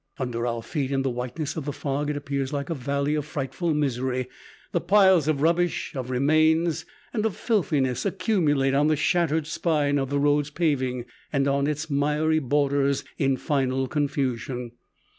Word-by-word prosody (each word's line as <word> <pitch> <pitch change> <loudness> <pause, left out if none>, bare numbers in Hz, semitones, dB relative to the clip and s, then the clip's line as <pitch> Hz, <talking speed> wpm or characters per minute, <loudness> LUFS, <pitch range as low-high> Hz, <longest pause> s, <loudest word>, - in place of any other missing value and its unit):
Under 120 -2 -2
our 115 -1 -2
feet 140 +1 -2
in 135 -1 +1
the 135 - 0
whiteness 125 +5 -4
of 155 -4 -4
the 145 - -2
fog 145 +1 -2
it 150 - -1
appears 140 -2 -3
like 145 +2 -3
a - - +2
valley 140 +1 -1
of 150 -1 0
frightful 150 +3 -3
misery. 130 -3 -1 0.4
The 175 - 0
piles 190 -4 +5
of 150 -2 +1
rubbish, 170 +1 +1
of 130 -2 -4
remains 155 +5 +2 0.3
and 215 -3 0
of 220 -4 0
filthiness 150 - 0
accumulate 165 -9 +1
on 145 +2 +3
the 155 - +3
shattered 160 0 +1
spine 150 -3 +1
of 135 -1 -2
the 145 - 0
road's 145 0 +2
paving 130 -6 -1 0.3
and 140 -1 +1
on 140 0 +1
its 150 +1 -2
miry 150 +3 +2
borders 140 0 +1 0.2
in 135 -2 +2
final 135 -3 0
confusion. 130 -4 -2
145 Hz, 170 wpm, -25 LUFS, 135-155 Hz, 0.4 s, piles